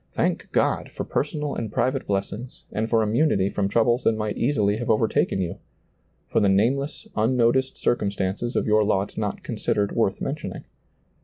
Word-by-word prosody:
Thank -, -, -1 dB
God -, -, +1 dB
for -, -, -5 dB
personal 150 Hz, 0 st, -2 dB
and 110 Hz, -3 st, -4 dB
private 130 Hz, +4 st, 0 dB
blessings 100 Hz, +5 st, -4 dB
and 110 Hz, +2 st, -2 dB
for 115 Hz, -1 st, +3 dB
immunity 105 Hz, -3 st, +2 dB
from 100 Hz, -1 st, 0 dB
troubles 120 Hz, +4 st, +2 dB
that -, -, +4 dB
might 105 Hz, -1 st, -2 dB
easily 110 Hz, -6 st, +1 dB
have 120 Hz, +1 st, -4 dB
overtaken 110 Hz, -3 st, +2 dB
you; 85 Hz, -2 st, -4 dB, 0.7 s
for -, -, +1 dB
the 100 Hz, -, +3 dB
nameless, 130 Hz, +9 st, +1 dB
unnoticed 125 Hz, +3 st, +2 dB
circumstances 100 Hz, +1 st, -1 dB
of -, -, +1 dB
your 110 Hz, 0 st, +4 dB
lot 100 Hz, -1 st, 0 dB
not -, -, -3 dB
considered 100 Hz, -1 st, -1 dB
worth 100 Hz, -4 st, +1 dB
mentioning. 145 Hz, +2 st, -4 dB
110 Hz, 160 wpm, -24 LUFS, 100-125 Hz, 0.7 s, that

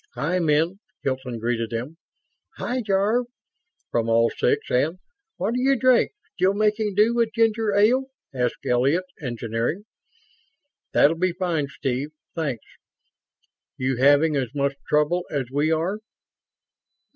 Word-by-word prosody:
"Hi, 155 Hz, +9 st, 0 dB
men," 165 Hz, +3 st, +1 dB, 0.2 s
Hilton 130 Hz, -3 st, -2 dB
greeted 115 Hz, 0 st, -1 dB
them. 125 Hz, +8 st, -5 dB, 0.6 s
"Hi, 250 Hz, +1 st, -2 dB
Jarve," 210 Hz, +4 st, +1 dB, 0.6 s
from 115 Hz, -1 st, 0 dB
all 115 Hz, 0 st, +3 dB
six, -, -, 0 dB
and: 150 Hz, +8 st, +1 dB, 0.4 s
"What'll 230 Hz, +5 st, -1 dB
you 270 Hz, +2 st, +3 dB
drink? 255 Hz, -, +3 dB, 0.2 s
Still 195 Hz, 0 st, +2 dB
making 210 Hz, -1 st, +1 dB
do 215 Hz, +3 st, +4 dB
with 235 Hz, -2 st, +1 dB
ginger 225 Hz, -2 st, +2 dB
ale?" 240 Hz, +6 st, +4 dB, 0.3 s
asked 125 Hz, -2 st, -2 dB
Elliott 135 Hz, +9 st, +2 dB, 0.2 s
(Engineering). 120 Hz, -, -3 dB, 1.1 s
"That'll 160 Hz, +3 st, +4 dB
be 185 Hz, 0 st, +1 dB
fine, 170 Hz, -5 st, -1 dB
Steve. 140 Hz, -1 st, -3 dB, 0.2 s
Thanks. 140 Hz, -9 st, -3 dB, 1.1 s
You 130 Hz, -1 st, -1 dB
having 145 Hz, +4 st, +4 dB
as 130 Hz, -1 st, -2 dB
much 140 Hz, 0 st, +1 dB, 0.2 s
trouble 150 Hz, +4 st, +2 dB
as 135 Hz, -4 st, -3 dB
we 145 Hz, +3 st, +1 dB
are?" 170 Hz, +6 st, 0 dB
160 Hz, 125 wpm, -24 LUFS, 130-205 Hz, 1.1 s, do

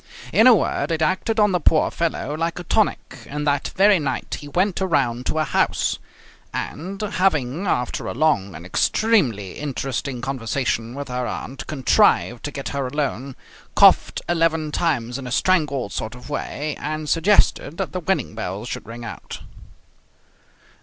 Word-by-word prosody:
In 225 Hz, -, +6 dB
a 250 Hz, -, +9 dB
word, 195 Hz, -, 0 dB
it 160 Hz, -1 st, +1 dB
acted 190 Hz, +7 st, 0 dB
on 210 Hz, -1 st, +4 dB
the 180 Hz, -, +1 dB
poor 155 Hz, 0 st, +3 dB
fellow 160 Hz, -3 st, -2 dB
like 165 Hz, +1 st, -2 dB
a 180 Hz, -, -5 dB
tonic, 215 Hz, +5 st, 0 dB
and 150 Hz, +1 st, -4 dB
that 145 Hz, -1 st, +1 dB
very 200 Hz, -1 st, +5 dB
night 145 Hz, -3 st, -3 dB
he 145 Hz, -, -10 dB
went 185 Hz, +6 st, 0 dB
around 135 Hz, -9 st, 0 dB
to -, -, -1 dB
her 155 Hz, -, +3 dB
house, -, -, 0 dB, 0.5 s
and 190 Hz, +6 st, -5 dB
having, 185 Hz, -6 st, 0 dB
after 125 Hz, -7 st, -1 dB
a -, -, -4 dB
long 115 Hz, -, +1 dB
and 80 Hz, +3 st, -9 dB
extremely 120 Hz, -, +1 dB
interesting 135 Hz, -2 st, -3 dB
conversation 120 Hz, -1 st, -2 dB
with 140 Hz, -1 st, -5 dB
her 125 Hz, -1 st, -2 dB
aunt, 135 Hz, +1 st, -6 dB
contrived 130 Hz, -4 st, +2 dB
to 145 Hz, -, -3 dB
get 140 Hz, -1 st, -5 dB
her 140 Hz, -2 st, -2 dB
alone, 135 Hz, -2 st, -3 dB, 0.4 s
coughed -, -, +5 dB
eleven 165 Hz, -2 st, +1 dB
times 130 Hz, -7 st, -1 dB
in 130 Hz, -, -7 dB
a -, -, -6 dB
strangled 140 Hz, -, +1 dB
sort 110 Hz, +2 st, -4 dB
of 125 Hz, +4 st, -11 dB
way, 150 Hz, +1 st, -3 dB
and 155 Hz, +1 st, -4 dB
suggested 165 Hz, -2 st, +2 dB
that 195 Hz, -1 st, -3 dB
the 185 Hz, -, -3 dB
wedding 190 Hz, -, -1 dB
bells 105 Hz, 0 st, -5 dB
should -, -, -6 dB
ring 115 Hz, +1 st, -8 dB
out. -, -, -8 dB
145 Hz, 165 wpm, -22 LUFS, 125-175 Hz, 0.5 s, a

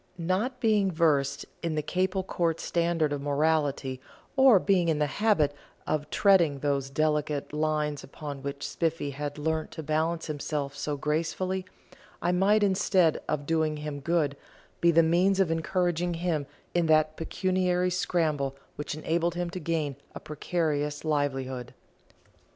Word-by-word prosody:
Not 190 Hz, +10 st, -1 dB
being 215 Hz, -5 st, +3 dB
versed 145 Hz, -4 st, +1 dB, 0.2 s
in 165 Hz, -2 st, -2 dB
the 150 Hz, -, -1 dB
Capel 185 Hz, +3 st, 0 dB
Court 170 Hz, -3 st, -1 dB
standard 170 Hz, -3 st, 0 dB
of 145 Hz, -, -3 dB
morality, 145 Hz, -3 st, 0 dB, 0.3 s
or 265 Hz, -5 st, +7 dB
being 185 Hz, -2 st, +2 dB
in 160 Hz, -, +2 dB
the 150 Hz, -, +2 dB
habit 155 Hz, -2 st, +2 dB, 0.3 s
of 150 Hz, -1 st, -2 dB
treading 175 Hz, -8 st, +4 dB
those 140 Hz, -1 st, -1 dB
delicate 150 Hz, 0 st, 0 dB
lines 150 Hz, -1 st, -1 dB
upon 140 Hz, 0 st, -7 dB
which 140 Hz, 0 st, -4 dB
Spiffy 165 Hz, -3 st, -1 dB
had 145 Hz, +1 st, -5 dB
learnt 160 Hz, +1 st, -1 dB
to 160 Hz, -, -6 dB
balance 160 Hz, +2 st, 0 dB
himself 145 Hz, -2 st, -3 dB
so 145 Hz, +1 st, -3 dB
gracefully, 170 Hz, +6 st, -1 dB, 0.5 s
I 175 Hz, -, +1 dB
might, 200 Hz, +4 st, +3 dB
instead 190 Hz, -4 st, +3 dB
of 145 Hz, -1 st, -1 dB
doing 160 Hz, -1 st, +1 dB
him 150 Hz, -1 st, -5 dB
good, 150 Hz, -1 st, 0 dB, 0.4 s
be 170 Hz, -, +4 dB
the 165 Hz, 0 st, +5 dB
means 180 Hz, +4 st, +3 dB
of 185 Hz, -4 st, +3 dB
encouraging 175 Hz, +1 st, 0 dB
him 165 Hz, -4 st, -1 dB, 0.3 s
in 175 Hz, -2 st, +2 dB
that 155 Hz, 0 st, +3 dB
pecuniary 180 Hz, +1 st, 0 dB
scramble 155 Hz, -6 st, 0 dB, 0.2 s
which 150 Hz, 0 st, -4 dB
enabled 165 Hz, +2 st, 0 dB
him 175 Hz, -1 st, -2 dB
to 185 Hz, -, -5 dB
gain 155 Hz, -6 st, -2 dB, 0.2 s
a -, -, -5 dB
precarious 150 Hz, -1 st, -2 dB
livelihood. 135 Hz, -4 st, -2 dB
160 Hz, 145 wpm, -28 LUFS, 145-175 Hz, 0.5 s, or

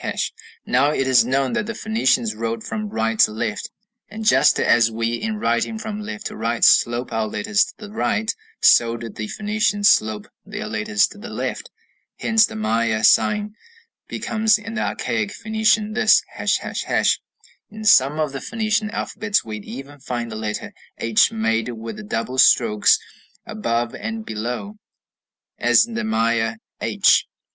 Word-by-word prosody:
Now 130 Hz, +4 st, +2 dB
it 135 Hz, -3 st, 0 dB
is 125 Hz, -3 st, +4 dB
known 130 Hz, +1 st, 0 dB
that 210 Hz, -, -1 dB
the 230 Hz, -, -4 dB
Phoenicians 130 Hz, -, +1 dB
wrote 115 Hz, +1 st, -4 dB
from 215 Hz, -1 st, -4 dB
right 115 Hz, -, -2 dB
to -, -, +5 dB
left, 110 Hz, -1 st, -4 dB, 0.4 s
and 220 Hz, +1 st, -7 dB
just -, -, +4 dB
as 115 Hz, -1 st, +4 dB
we 115 Hz, +1 st, -2 dB
in 215 Hz, -, -3 dB
writing 120 Hz, -, -1 dB
from 215 Hz, -1 st, -5 dB
left 105 Hz, -, -7 dB
to -, -, -5 dB
right 115 Hz, +1 st, -2 dB
slope 120 Hz, +1 st, +3 dB
our 110 Hz, -1 st, 0 dB
letters 205 Hz, -, +1 dB
to -, -, -12 dB
the 210 Hz, -2 st, -10 dB
right, 220 Hz, 0 st, -1 dB, 0.3 s
so 115 Hz, 0 st, +5 dB
did 115 Hz, -2 st, -8 dB
the 110 Hz, -, -5 dB
Phoenicians 210 Hz, -, +1 dB
slope 110 Hz, -1 st, +1 dB, 0.2 s
their -, -, -6 dB
letters 105 Hz, -1 st, +1 dB
to 205 Hz, -, -13 dB
the 235 Hz, +3 st, -8 dB
left. -, -, -4 dB, 0.5 s
Hence 225 Hz, -1 st, +3 dB
the -, -, -10 dB
Maya 110 Hz, 0 st, 0 dB
sign 210 Hz, -, +3 dB, 0.5 s
becomes 220 Hz, -1 st, +1 dB
in 225 Hz, +1 st, -8 dB
the 220 Hz, -, -2 dB
archaic 225 Hz, -3 st, -2 dB
Phoenician 220 Hz, -1 st, 0 dB
this, 215 Hz, -, +4 dB
###. -, -, -2 dB
In 215 Hz, 0 st, -9 dB
some 150 Hz, -8 st, +4 dB
of 155 Hz, -2 st, 0 dB
the 135 Hz, -, -6 dB
Phoenician 215 Hz, -1 st, -1 dB
alphabets 210 Hz, -1 st, -2 dB
we 110 Hz, -1 st, -5 dB
even 135 Hz, +7 st, -10 dB
find 120 Hz, -3 st, -4 dB
the -, -, -6 dB
letter 110 Hz, -1 st, -5 dB, 0.2 s
h 115 Hz, -2 st, +3 dB
made 115 Hz, +1 st, -1 dB
with 115 Hz, -, -7 dB
the 215 Hz, -, -8 dB
double 130 Hz, -, -3 dB
strokes 105 Hz, -5 st, +5 dB, 0.5 s
above 115 Hz, +2 st, -2 dB
and 220 Hz, 0 st, -5 dB
below, 125 Hz, -, -5 dB, 0.8 s
as -, -, +4 dB
in 235 Hz, -, -10 dB
the 240 Hz, +1 st, -2 dB
Maya 115 Hz, -, 0 dB, 0.3 s
h. -, -, +3 dB
130 Hz, 160 wpm, -21 LUFS, -, 0.8 s, to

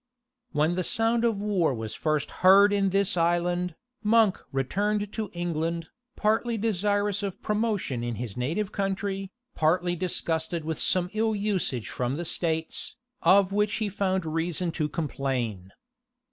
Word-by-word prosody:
When 155 Hz, +3 st, +2 dB
the 185 Hz, +1 st, -1 dB
sound 225 Hz, +4 st, +1 dB
of 225 Hz, -4 st, +1 dB
war 195 Hz, -9 st, +1 dB
was 110 Hz, -1 st, -5 dB
first 155 Hz, -2 st, -1 dB
heard 200 Hz, +2 st, +7 dB
in 200 Hz, -1 st, +2 dB
this 195 Hz, +1 st, +1 dB
island, 175 Hz, 0 st, +1 dB, 0.3 s
Monk 220 Hz, -2 st, +3 dB
returned 205 Hz, +10 st, -1 dB
to 215 Hz, -3 st, -3 dB
England, 170 Hz, -1 st, -2 dB, 0.3 s
partly 220 Hz, +2 st, +1 dB
desirous 205 Hz, -1 st, +1 dB
of 200 Hz, -3 st, -4 dB
promotion 210 Hz, -, -1 dB
in 120 Hz, -1 st, -2 dB
his 110 Hz, -2 st, -5 dB
native 170 Hz, +12 st, -1 dB
country, 195 Hz, -1 st, -2 dB, 0.2 s
partly 175 Hz, +3 st, +2 dB
disgusted 165 Hz, -2 st, -2 dB
with 160 Hz, 0 st, -3 dB
some 180 Hz, 0 st, +1 dB
ill 220 Hz, 0 st, +1 dB
usage 195 Hz, -, -1 dB
from 125 Hz, +2 st, -2 dB
the 170 Hz, +3 st, -4 dB
states, 160 Hz, -1 st, -2 dB, 0.3 s
of 195 Hz, 0 st, +5 dB
which 210 Hz, +1 st, +1 dB
he 215 Hz, -2 st, -1 dB
found 190 Hz, -2 st, 0 dB
reason 165 Hz, +2 st, -1 dB
to 155 Hz, -2 st, -1 dB
complain. 130 Hz, -, -3 dB
180 Hz, 145 wpm, -27 LUFS, 160-205 Hz, 0.3 s, heard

